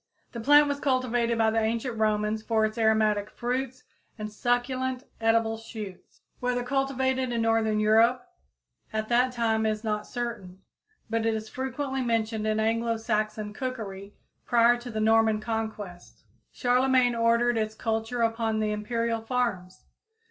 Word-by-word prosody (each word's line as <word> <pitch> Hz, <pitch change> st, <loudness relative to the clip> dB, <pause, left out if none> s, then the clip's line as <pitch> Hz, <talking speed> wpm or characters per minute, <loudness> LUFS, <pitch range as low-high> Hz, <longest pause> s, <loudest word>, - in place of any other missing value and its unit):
The 235 Hz, -, -6 dB
plant 290 Hz, +5 st, +6 dB
was 285 Hz, 0 st, -2 dB
cultivated 245 Hz, -4 st, +1 dB
by 220 Hz, -1 st, +3 dB
the 225 Hz, -, +1 dB
ancient 230 Hz, +2 st, -1 dB
Romans 215 Hz, 0 st, 0 dB
for 220 Hz, 0 st, +1 dB
its 215 Hz, 0 st, -3 dB
aromatic 215 Hz, -2 st, +2 dB
fruits 255 Hz, +1 st, -3 dB, 0.3 s
and 215 Hz, -1 st, -6 dB
succulent, 255 Hz, +3 st, -1 dB, 0.2 s
edible 225 Hz, 0 st, +2 dB
shoots. 215 Hz, -4 st, -10 dB, 0.2 s
Whether 245 Hz, 0 st, -1 dB
cultivated 260 Hz, -1 st, 0 dB
in 230 Hz, -1 st, 0 dB
northern 225 Hz, -1 st, +2 dB
Europe 225 Hz, +8 st, +3 dB, 0.6 s
at 215 Hz, 0 st, -3 dB
that 250 Hz, +2 st, +3 dB
time 225 Hz, -2 st, 0 dB
is 215 Hz, 0 st, -1 dB
not 210 Hz, -1 st, -2 dB
certain, 205 Hz, -6 st, -6 dB, 0.4 s
but 225 Hz, 0 st, -1 dB
it 225 Hz, -, +1 dB
is 215 Hz, 0 st, -5 dB
frequently 265 Hz, +1 st, -3 dB
mentioned 225 Hz, -2 st, -1 dB
in 215 Hz, 0 st, +1 dB
Anglo 230 Hz, +1 st, +1 dB
Saxon 215 Hz, -1 st, -2 dB
cookery 210 Hz, -6 st, -6 dB, 0.3 s
prior 240 Hz, 0 st, +4 dB
to 240 Hz, 0 st, -8 dB
the 220 Hz, -2 st, -3 dB
Norman 220 Hz, 0 st, +3 dB
conquest. 215 Hz, -5 st, -5 dB, 0.3 s
Charlemagne 250 Hz, 0 st, +3 dB
ordered 235 Hz, +1 st, +2 dB
its 220 Hz, -1 st, -1 dB
culture 225 Hz, +2 st, -1 dB
upon 225 Hz, -1 st, 0 dB
the 215 Hz, -1 st, 0 dB
imperial 230 Hz, +2 st, -1 dB
farms. 225 Hz, -7 st, -2 dB
225 Hz, 145 wpm, -27 LUFS, 215-245 Hz, 0.6 s, plant